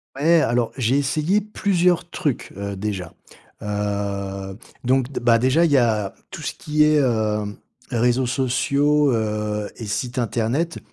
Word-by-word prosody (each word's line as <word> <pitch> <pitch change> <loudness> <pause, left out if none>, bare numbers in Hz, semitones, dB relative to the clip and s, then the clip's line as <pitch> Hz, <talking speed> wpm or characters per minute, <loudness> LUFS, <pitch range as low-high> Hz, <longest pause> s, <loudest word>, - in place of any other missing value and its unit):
Ouais, 160 +3 +4
alors 120 -1 +1
j'ai 130 +2 +2
essayé 155 +9 +1
plusieurs 180 -4 +1
trucs, 145 -6 -2
heu, 100 -1 -4
déjà, 95 -4 -4 0.5
heu, 100 -1 -3 0.3
donc 130 0 +2
d 140 - -4
bah, 120 -1 +4
déjà, 130 +8 +3
il 165 - +2
y 140 - +5
a 105 -5 +1 0.2
tout - - -8
ce - - -3
qui 150 0 +1
est, 150 0 +4
heu, 110 -5 +1 0.5
réseaux 125 +1 +2
sociaux, 140 +3 +2
heu, 105 -2 -2
et 115 - -7
sites 120 +4 -3
internet. 125 +8 -1
120 Hz, 150 wpm, -22 LUFS, 105-145 Hz, 0.5 s, y